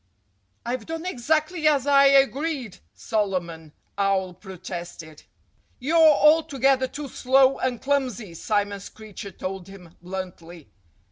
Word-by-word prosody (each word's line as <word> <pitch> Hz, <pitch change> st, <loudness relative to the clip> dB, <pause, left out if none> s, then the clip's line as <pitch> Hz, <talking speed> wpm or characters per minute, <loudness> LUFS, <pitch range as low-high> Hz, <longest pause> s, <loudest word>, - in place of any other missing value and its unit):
"I've 240 Hz, -1 st, -4 dB
done 325 Hz, +1 st, -5 dB
exactly 315 Hz, +2 st, 0 dB
as 285 Hz, -3 st, +3 dB
I 280 Hz, -1 st, +5 dB
agreed!" 275 Hz, -, +1 dB, 0.2 s
Solomon 180 Hz, -7 st, -3 dB, 0.3 s
Owl 195 Hz, -2 st, +1 dB
protested. 175 Hz, -4 st, -9 dB, 0.6 s
"You're 310 Hz, +6 st, +1 dB
altogether 295 Hz, -4 st, +4 dB
too 290 Hz, +2 st, -7 dB
slow 265 Hz, +1 st, +3 dB
and 250 Hz, -2 st, -1 dB
clumsy," 255 Hz, -9 st, -2 dB
Simon 205 Hz, +3 st, -1 dB
Screecher 205 Hz, 0 st, -10 dB
told 185 Hz, 0 st, -6 dB
him 180 Hz, -4 st, -14 dB
bluntly. 175 Hz, -3 st, -8 dB
235 Hz, 110 wpm, -24 LUFS, 185-280 Hz, 0.6 s, I